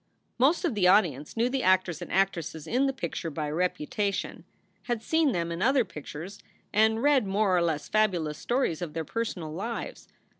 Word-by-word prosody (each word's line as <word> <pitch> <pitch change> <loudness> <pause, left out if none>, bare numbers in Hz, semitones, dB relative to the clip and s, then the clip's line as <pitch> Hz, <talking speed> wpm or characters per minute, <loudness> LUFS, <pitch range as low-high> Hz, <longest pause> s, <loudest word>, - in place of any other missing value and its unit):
Most 300 +9 +3
of 330 - 0
the 195 -4 +3
audience 175 - +2
knew 235 +2 +3
the 260 +1 -1
actors 185 -3 +2
and 175 - -7
actresses 170 -5 0
in 255 +9 +1
the - - +1
picture 170 -9 -4
by 150 -1 -3
reputation, 180 +4 -2 0.4
had 240 -3 -2
seen 320 -3 +2
them 170 -4 -2
in 170 +2 -4
other 260 +1 +3
pictures, 165 +3 -8 0.3
and 220 +2 +3
read 280 -7 +4
more 195 -1 +2
or 175 - +3
less 160 -3 -1
fabulous 180 -8 +1
stories 240 - 0
of 165 -4 -4
their 160 -1 -3
personal 180 -7 -4
lives. 225 +7 -5
190 Hz, 180 wpm, -28 LUFS, 165-230 Hz, 0.4 s, read